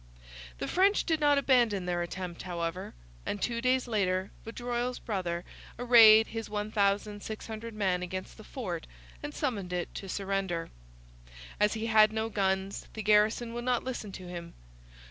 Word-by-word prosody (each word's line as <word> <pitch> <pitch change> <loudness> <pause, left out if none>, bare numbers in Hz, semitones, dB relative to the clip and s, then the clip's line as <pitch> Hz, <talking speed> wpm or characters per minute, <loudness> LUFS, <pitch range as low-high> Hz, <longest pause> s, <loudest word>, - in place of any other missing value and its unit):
The - - -3
French 390 +3 +3
did 320 -2 0
not 290 -1 +4
abandon 240 -9 +3
their 175 -1 -1
attempt, 175 0 -5
however, 170 - -4 0.3
and 205 - -3
two 235 +3 -1
days 255 0 +2
later 190 -4 0
Vaudreuil's 245 +2 -3
brother 180 -5 -3 0.3
arrayed 225 -3 +8
his 225 0 -5
1,600 210 +2 -2
men 190 -4 +1
against 185 +1 -6
the 215 - -11
fort 185 -10 -5 0.3
and 290 - -5
summoned 225 - -3
it 175 -1 -3
to 195 - -7
surrender. 195 -4 -2 0.9
As 210 +1 +3
he 220 0 -3
had 215 -1 +5
no 220 0 -2
guns 195 -2 -1
the 220 - -4
garrison 215 +3 +3
would 240 0 -4
not 250 -2 +1
listen 240 -5 -5
to 185 -1 -8
him. 170 -1 -8
210 Hz, 150 wpm, -30 LUFS, 185-235 Hz, 0.9 s, arrayed